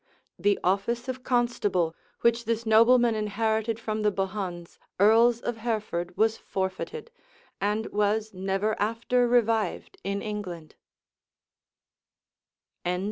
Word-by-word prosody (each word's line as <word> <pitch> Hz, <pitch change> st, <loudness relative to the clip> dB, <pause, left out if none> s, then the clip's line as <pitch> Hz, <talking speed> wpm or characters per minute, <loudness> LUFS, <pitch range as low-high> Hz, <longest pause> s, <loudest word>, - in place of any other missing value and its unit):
The 205 Hz, -1 st, +2 dB
office 200 Hz, +7 st, 0 dB
of 260 Hz, 0 st, -5 dB
constable, 210 Hz, -10 st, +1 dB, 0.3 s
which 235 Hz, 0 st, +2 dB
this 230 Hz, +1 st, -1 dB
nobleman 230 Hz, +2 st, +5 dB
inherited 220 Hz, +1 st, -1 dB
from 215 Hz, -1 st, -3 dB
the 210 Hz, 0 st, +2 dB
Bohuns, 190 Hz, -3 st, -4 dB, 0.2 s
earls 230 Hz, +3 st, +5 dB
of 240 Hz, -1 st, -3 dB
Hereford, 215 Hz, -6 st, -3 dB
was 220 Hz, +1 st, +2 dB
forfeited, 195 Hz, -, -4 dB, 0.5 s
and 210 Hz, +2 st, 0 dB
was 210 Hz, +1 st, 0 dB
never 195 Hz, +3 st, -1 dB
after 230 Hz, +3 st, +1 dB
revived 225 Hz, -5 st, +1 dB
in 200 Hz, +2 st, -2 dB
England. 185 Hz, -7 st, -6 dB
215 Hz, 105 wpm, -27 LUFS, 195-230 Hz, 0.5 s, nobleman